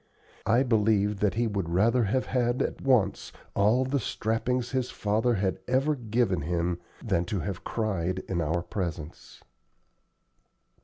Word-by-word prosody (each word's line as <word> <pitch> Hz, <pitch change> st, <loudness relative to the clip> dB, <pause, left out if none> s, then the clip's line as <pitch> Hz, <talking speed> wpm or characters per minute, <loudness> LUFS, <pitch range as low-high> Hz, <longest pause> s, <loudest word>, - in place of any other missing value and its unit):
I 120 Hz, +4 st, +4 dB
believe 105 Hz, -4 st, +2 dB
that 105 Hz, 0 st, +1 dB
he 120 Hz, +1 st, +1 dB
would 100 Hz, -6 st, -2 dB
rather 115 Hz, +7 st, +3 dB
have 130 Hz, +6 st, 0 dB
had 120 Hz, -1 st, +1 dB
at -, -, -4 dB
once 125 Hz, -8 st, +2 dB, 0.2 s
all 110 Hz, +6 st, +3 dB
the 140 Hz, +2 st, 0 dB
strappings 120 Hz, +3 st, -1 dB
his 130 Hz, -2 st, -1 dB
father 110 Hz, +1 st, +1 dB
had 95 Hz, -2 st, -1 dB
ever 135 Hz, +4 st, +2 dB
given 115 Hz, -, 0 dB
him 85 Hz, +2 st, -1 dB, 0.3 s
than 95 Hz, -6 st, +1 dB
to 95 Hz, +2 st, -2 dB
have 95 Hz, +2 st, -5 dB
cried 95 Hz, -5 st, -2 dB
in 85 Hz, -3 st, -1 dB
our 85 Hz, +2 st, 0 dB
presence. 85 Hz, -7 st, -6 dB
105 Hz, 145 wpm, -28 LUFS, 95-120 Hz, 0.3 s, I